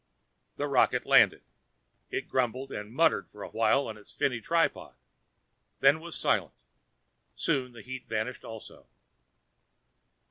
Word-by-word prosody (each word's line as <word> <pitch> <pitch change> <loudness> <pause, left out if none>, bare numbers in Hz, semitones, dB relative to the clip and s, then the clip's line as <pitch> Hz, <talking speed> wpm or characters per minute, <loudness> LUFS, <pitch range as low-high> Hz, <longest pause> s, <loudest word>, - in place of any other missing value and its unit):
The 145 - -2
rocket 135 -3 +2
landed. - - +5 0.7
It - - -3
grumbled 130 +1 -1
and 105 +1 -6
muttered 160 +6 +2
for 105 - -10
a - - -7
while 135 +5 +2
on 110 - -6
its 105 - -16
finny 125 -3 -1
tripod, 165 +6 0 0.8
then 140 +3 +5
was 170 0 -8
silent; - - 0 0.8
soon 125 -2 -1
the 115 - -11
heat 130 -1 -8
vanished 110 +3 -3
also. 110 -2 -11
125 Hz, 130 wpm, -29 LUFS, 115-140 Hz, 0.8 s, landed